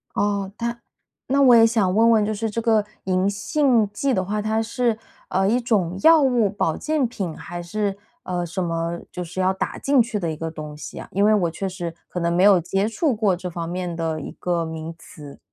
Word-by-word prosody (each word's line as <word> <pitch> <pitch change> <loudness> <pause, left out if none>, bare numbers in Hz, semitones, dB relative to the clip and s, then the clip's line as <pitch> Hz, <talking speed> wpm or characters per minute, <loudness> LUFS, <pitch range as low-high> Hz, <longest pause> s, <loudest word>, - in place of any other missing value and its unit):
哦， 200 -1 0
它 235 0 -3 0.5
那 275 +2 +2
我 250 -3 +7
也 225 - +7
想 215 -5 +2
问 230 +2 +5
问 215 -2 +4
就 215 - -1
是 220 +1 -2
这 230 +2 -3
个 220 -2 +2 0.2
银 185 0 +1
杏 235 0 +2
剂 270 +5 0
的 185 -4 +1
话， 210 +3 -2
它 220 +1 0
是， 230 0 0 0.3
呃， 190 +1 +1
一 245 +3 +2
种 195 -7 0
药 320 -1 +7
物 245 -7 +3
保 175 -5 -1
健 305 -4 0
品？ 190 -8 -5
还 175 0 -7
是， 200 +2 -2 0.3
呃， 180 -1 -2
什 180 +2 -3
么？ 165 0 -2
就 180 - -5
是 175 +2 -7
要 185 0 +3
打 190 - -3
进 275 -1 +2
去 225 -2 -2
的 170 -4 -2
一 - - -4
个 165 +1 -5
东 150 -2 -8
西 - - -9
呀？ - - -7
因 200 +3 +2
为 215 - +5
我 180 -5 +2
确 195 +4 -4
实 175 -3 -5
可 180 - -5
能 170 0 0
没 180 +2 +2
有 200 -3 +7
接 195 +5 -1
触 255 +4 0
过 210 -4 +2
这 180 0 -6
方 170 -1 -5
面 180 -1 -4
的 160 -2 -2
一 - - -7
个 175 -2 -1
名 160 0 -6
词。 150 -4 -12
195 Hz, 245 characters per minute, -22 LUFS, 175-225 Hz, 0.5 s, 我